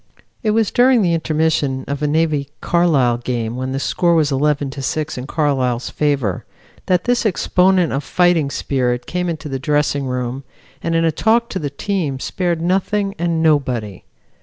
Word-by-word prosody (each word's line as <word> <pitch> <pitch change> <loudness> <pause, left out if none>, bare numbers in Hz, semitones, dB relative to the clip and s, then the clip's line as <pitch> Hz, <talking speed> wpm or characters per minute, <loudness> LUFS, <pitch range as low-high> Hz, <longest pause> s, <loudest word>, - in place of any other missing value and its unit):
It 220 - 0
was 220 -1 +2
during 245 -2 +4
the 175 -2 +2
intermission 155 -4 0
of 140 0 -3
a 150 - +1
Navy 150 -2 0
Carlisle 145 -9 +2
game 120 -2 -3
when 130 +1 -3
the 135 - -2
score 170 +4 +1
was 155 -3 +2
11 140 0 0
to 135 - -7
6 155 +3 -2
in 125 +1 -6
Carlisle's 130 -6 0
favor, 140 -10 0 0.4
that 180 -1 +2
this 245 0 +1
exponent 185 -3 +2
of 140 +2 -2
fighting 175 -3 +2
spirit 125 -3 -1
came 180 0 -2
into 155 -2 -5
the 135 -2 -4
dressing 145 0 0
room 125 +1 -3 0.4
and 165 0 -1
in 165 0 +2
a 165 - +3
talk 230 - +1
to 190 - -3
the 145 - -3
team 150 -3 -2
spared 170 +2 -2
nothing 195 +2 0
and 165 -1 0
nobody. 125 - 0
150 Hz, 175 wpm, -19 LUFS, 135-175 Hz, 0.4 s, during